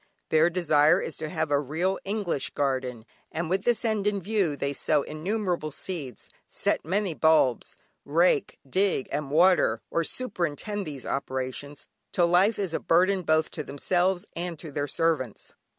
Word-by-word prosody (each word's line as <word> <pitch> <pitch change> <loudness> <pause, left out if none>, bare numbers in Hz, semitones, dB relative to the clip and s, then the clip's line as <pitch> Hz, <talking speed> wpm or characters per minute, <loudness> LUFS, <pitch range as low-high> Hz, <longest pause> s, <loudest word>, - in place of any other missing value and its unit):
Their 160 +2 +4
desire 165 -1 +4
is - - -4
to 155 -1 -5
have 160 -2 -2
a 145 - +4
real 160 +7 -1
English 195 -8 -2
garden, 130 -5 -1 0.3
and 165 +1 -3
with 190 +1 0
this 240 0 +1
end 215 -2 0
in 205 -1 +1
view, 195 -5 0
they 140 0 -2
sow 145 +1 +1
innumerable 175 0 -2
seeds, 145 - -6 0.2
set - - -1
many 190 +2 -1
bulbs, 155 -7 +2 0.3
rake, 160 0 +2
dig 185 -2 +1
and 145 -1 -2
water 160 -7 +4
(or 165 - +1
superintend 200 - -2
these 140 -4 -7
operations) 135 +1 -4 0.2
till 175 - +3
life 180 +6 +3
is 190 -5 -2
a - - 0
burden 185 +3 +3
both 155 -1 +1
to 150 - -4
themselves 175 +6 0
and 175 -1 -4
to 155 0 -9
their 145 +1 -2
servants. 145 -6 -1
165 Hz, 160 wpm, -27 LUFS, 145-185 Hz, 0.3 s, Their